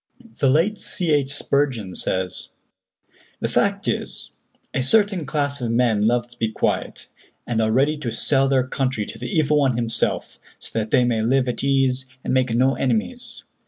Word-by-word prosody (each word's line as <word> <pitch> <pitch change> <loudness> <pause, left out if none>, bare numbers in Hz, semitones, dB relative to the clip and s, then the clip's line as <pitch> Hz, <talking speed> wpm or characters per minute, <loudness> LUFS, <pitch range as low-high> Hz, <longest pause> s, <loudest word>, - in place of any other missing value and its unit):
The 135 - +3
late 170 +10 +2
C. 175 -5 -2
H. 145 -2 +2
Spurgeon 135 -9 -1
says: 95 0 -3 0.9
"The - - -1
fact - - 0
is, - - -3 0.4
a - - 0
certain 195 - +2
class 145 -1 -1
of 120 - -1
men 115 -3 +2
love 120 +1 +1
to 120 - -19
be 115 - +1
quiet, - - -2 0.4
and 115 -2 0
are 110 0 +1
ready 140 +6 +2
to 120 -5 -3
sell 135 +1 +1
their 130 -2 +2
country 130 -4 -1
to - - -8
the - - -5
evil 155 -5 +2
one 135 -4 +2
himself, 115 -1 -1 0.2
so 115 - -3
that 110 0 -3
they 125 - +4
may 115 -2 +1
live 130 +3 +2
at 125 - -3
ease 135 -1 +1 0.2
and - - -1
make 130 -2 +2
no 130 +3 +3
enemies. 235 - -2
130 Hz, 180 wpm, -22 LUFS, 115-145 Hz, 0.9 s, they